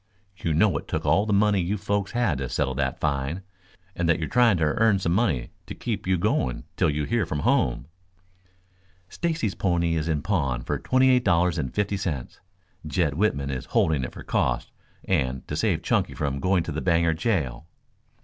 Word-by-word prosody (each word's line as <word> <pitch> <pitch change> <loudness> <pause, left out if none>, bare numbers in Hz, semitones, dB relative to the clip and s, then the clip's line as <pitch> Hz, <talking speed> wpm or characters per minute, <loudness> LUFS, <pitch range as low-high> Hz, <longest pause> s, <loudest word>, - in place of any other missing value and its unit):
You 85 -4 -2
know 90 -4 +3
it - - -13
took - - -3
all 100 +2 +3
the - - 0
money 100 -1 +3
you 95 +5 -1
folks 100 -1 -2
had 115 - +1
to 65 -2 -3
settle 70 -3 -1
that 65 0 -2
fine, 75 +4 -2 0.5
and 85 -1 0
that 85 - +4
you 80 - -1
are - - -8
trying 120 -6 +4
to 80 - 0
earn 100 +7 +3
some 90 -3 -1
money 85 - 0 0.2
to - - -7
keep 110 -6 -4
you 95 0 +2
going 65 -6 0
till - - +2
you 75 0 -1
hear 115 +7 0
from 75 -4 -3
home." - - +1 1.2
"Stacy's 160 - -1
pony 85 -2 0
is 80 -1 -1
in 75 -3 -1
pawn 70 - 0
for - - -2
twenty 130 0 +3
eight 125 -1 +3
dollars 85 -4 +2
and 65 -4 -2
fifty 100 -1 0
cents. 80 -10 -4 0.5
Jed 75 0 0
Whitman 70 -6 0
is 65 -2 -4
holding 75 -5 +1
it 60 - -5
for - - -9
costs - - -1 0.3
and 65 -8 -1
to - - -4
save - - 0
Chunky - - 0
from 70 -1 -2
going 90 +2 +2
to 85 - -5
the 80 - -3
Bangor 85 -2 +2
jail." 80 - -2
85 Hz, 200 wpm, -25 LUFS, 70-100 Hz, 1.2 s, that